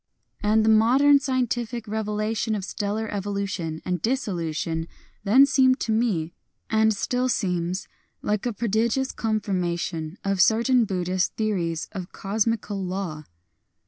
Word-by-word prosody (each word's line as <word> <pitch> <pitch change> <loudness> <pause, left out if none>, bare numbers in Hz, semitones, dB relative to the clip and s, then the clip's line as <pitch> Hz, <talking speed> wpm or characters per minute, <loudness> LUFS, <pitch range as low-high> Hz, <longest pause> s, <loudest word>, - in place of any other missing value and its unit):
And 215 +1 +3
the - - +4
modern 260 +6 +5
scientific 240 -3 -1
revela 215 0 -2
tion 220 0 0
of 195 -3 -3
stellar 210 +2 -3
evolution 195 -5 -3
and 180 -2 -2
dissolution 170 - -2 0.4
then 240 +7 +6
seemed 260 -1 +3
to 225 - -1
me, 205 -8 0 0.4
and 220 0 +4
still 250 +5 -1
seems, 180 -3 -1 0.4
like 210 +3 0
a - - 0
prodi 220 +1 +1
gious 265 +3 -2
confirmation 180 -6 -2
of 195 -1 +1
certain 235 +3 +4
Buddhist 185 -2 -1
theo 215 -1 0
ries 165 -4 -2
of 185 -2 -7
cosmical 210 0 -1
law. 180 -5 -4
210 Hz, 135 wpm, -25 LUFS, 185-230 Hz, 0.4 s, then